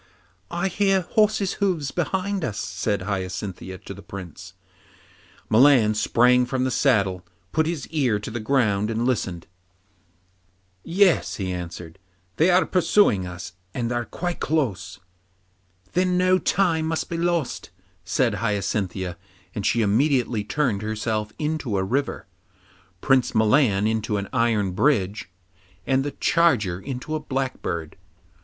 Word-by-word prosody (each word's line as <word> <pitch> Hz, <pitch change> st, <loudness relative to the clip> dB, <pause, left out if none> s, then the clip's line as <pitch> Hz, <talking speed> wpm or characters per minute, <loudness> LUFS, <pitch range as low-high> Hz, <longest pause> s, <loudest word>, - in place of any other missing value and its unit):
'I 175 Hz, +2 st, -1 dB
hear 195 Hz, +1 st, +2 dB
horses' 210 Hz, +2 st, +1 dB
hoofs 170 Hz, -8 st, 0 dB
behind 190 Hz, +2 st, -1 dB
us,' 105 Hz, -7 st, -3 dB
said 95 Hz, +2 st, -2 dB
Hyacinthia 95 Hz, -1 st, -4 dB
to -, -, -6 dB
the 100 Hz, -, -11 dB
Prince. 95 Hz, -1 st, -9 dB, 0.9 s
Milan 120 Hz, -2 st, +5 dB
sprang 125 Hz, +3 st, +3 dB
from 130 Hz, 0 st, -1 dB
the 130 Hz, -, 0 dB
saddle, 100 Hz, -9 st, +2 dB, 0.3 s
put 160 Hz, +8 st, +1 dB
his 160 Hz, -6 st, -3 dB
ear 135 Hz, -9 st, +1 dB
to 105 Hz, +2 st, -7 dB
the 120 Hz, -, -4 dB
ground 110 Hz, -4 st, +1 dB
and 115 Hz, +1 st, -1 dB
listened. 95 Hz, -9 st, -1 dB, 1.4 s
'Yes,' 185 Hz, 0 st, +2 dB
he 95 Hz, -2 st, -3 dB
answered, 85 Hz, -1 st, -7 dB, 0.4 s
'they 165 Hz, -, +4 dB
are 185 Hz, +1 st, +4 dB
pursuing 165 Hz, -, +3 dB
us, 85 Hz, -1 st, -8 dB, 0.2 s
and 120 Hz, -1 st, -2 dB
are 120 Hz, 0 st, -1 dB
quite 175 Hz, +6 st, -4 dB
close.' 120 Hz, -, -1 dB, 0.9 s
'Then 180 Hz, 0 st, +2 dB
no 185 Hz, +1 st, +3 dB
time 165 Hz, -6 st, +1 dB
must 160 Hz, 0 st, -2 dB
be 170 Hz, -, -4 dB
lost,' 170 Hz, -4 st, -1 dB, 0.3 s
said 115 Hz, +7 st, +1 dB
Hyacinthia, 100 Hz, -4 st, -2 dB, 0.3 s
and -, -, -2 dB
she 115 Hz, 0 st, +2 dB
immediately 120 Hz, 0 st, +1 dB
turned 115 Hz, -3 st, -1 dB
herself 110 Hz, 0 st, -2 dB
into 150 Hz, -8 st, -2 dB
a 95 Hz, -, +1 dB
river, 135 Hz, +9 st, -2 dB, 0.8 s
Prince 130 Hz, -2 st, +2 dB
Milan 110 Hz, -2 st, +3 dB
into 110 Hz, -1 st, 0 dB
an 100 Hz, 0 st, -4 dB
iron 115 Hz, -6 st, +1 dB
bridge, 100 Hz, -3 st, +1 dB, 0.6 s
and 135 Hz, 0 st, +2 dB
the 145 Hz, -, -2 dB
charger 120 Hz, -, +2 dB
into 130 Hz, +6 st, -6 dB
a 155 Hz, -, 0 dB
blackbird. 130 Hz, -, -4 dB
120 Hz, 135 wpm, -24 LUFS, 100-155 Hz, 1.4 s, Milan